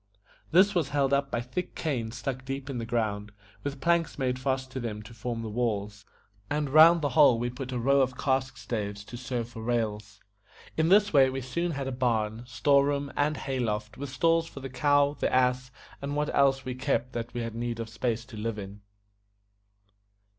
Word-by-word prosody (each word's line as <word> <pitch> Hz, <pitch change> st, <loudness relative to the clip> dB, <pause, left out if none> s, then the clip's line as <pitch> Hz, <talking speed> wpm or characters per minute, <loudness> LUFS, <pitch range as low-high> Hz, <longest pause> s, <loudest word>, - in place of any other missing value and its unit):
This 190 Hz, +5 st, +5 dB
was 165 Hz, -7 st, 0 dB
held 140 Hz, -1 st, +1 dB
up 140 Hz, 0 st, +2 dB
by 120 Hz, -, -1 dB
thick 125 Hz, +9 st, -5 dB
canes 120 Hz, -7 st, -2 dB
stuck 130 Hz, +1 st, -4 dB
deep 135 Hz, +1 st, -5 dB
in 125 Hz, -, -3 dB
the 115 Hz, -, -5 dB
ground, 105 Hz, -4 st, -1 dB, 0.3 s
with 140 Hz, -1 st, -4 dB
planks 170 Hz, +2 st, +1 dB
made 130 Hz, -2 st, -1 dB
fast 130 Hz, 0 st, -2 dB
to 130 Hz, -, -4 dB
them 105 Hz, -3 st, -5 dB
to 105 Hz, -, -12 dB
form 115 Hz, 0 st, -4 dB
the -, -, -4 dB
walls, 105 Hz, -3 st, -2 dB, 0.4 s
and 145 Hz, -2 st, -1 dB
round 160 Hz, +2 st, +7 dB
the 145 Hz, -, +2 dB
whole 125 Hz, -2 st, +6 dB
we 120 Hz, +1 st, -2 dB
put 130 Hz, +1 st, -6 dB
a 125 Hz, -, -2 dB
row 135 Hz, +3 st, +3 dB
of 130 Hz, -1 st, 0 dB
cask 130 Hz, -1 st, 0 dB
staves 105 Hz, -4 st, -4 dB
to 120 Hz, -, -10 dB
serve 120 Hz, -2 st, -4 dB
for 115 Hz, -2 st, -9 dB
rails. 110 Hz, -3 st, -2 dB, 0.6 s
In 160 Hz, +1 st, +2 dB
this 205 Hz, 0 st, +5 dB
way 135 Hz, -2 st, +6 dB
we 135 Hz, +1 st, -3 dB
soon 170 Hz, +7 st, -2 dB
had 140 Hz, -2 st, -3 dB
a -, -, -2 dB
barn, 115 Hz, -3 st, 0 dB
store 140 Hz, +2 st, +3 dB
room, 140 Hz, 0 st, -1 dB
and 150 Hz, +1 st, +1 dB
hay 135 Hz, -1 st, -3 dB
loft, 105 Hz, -2 st, -2 dB
with 140 Hz, 0 st, -6 dB
stalls 165 Hz, +5 st, +2 dB
for 140 Hz, -, -10 dB
the 135 Hz, 0 st, -6 dB
cow, 145 Hz, +2 st, +3 dB
the -, -, 0 dB
ass, 125 Hz, 0 st, +2 dB, 0.3 s
and 140 Hz, +1 st, -3 dB
what 150 Hz, 0 st, -1 dB
else 135 Hz, -1 st, +3 dB
we 130 Hz, -, -3 dB
kept 130 Hz, 0 st, -1 dB
that 120 Hz, 0 st, -4 dB
had 115 Hz, -2 st, -3 dB
need 115 Hz, 0 st, -3 dB
of 115 Hz, -, -3 dB
a -, -, -18 dB
place 120 Hz, -1 st, -1 dB
to 115 Hz, -3 st, -11 dB
live 110 Hz, 0 st, -3 dB
in. 100 Hz, 0 st, -8 dB
130 Hz, 210 wpm, -28 LUFS, 115-140 Hz, 0.6 s, round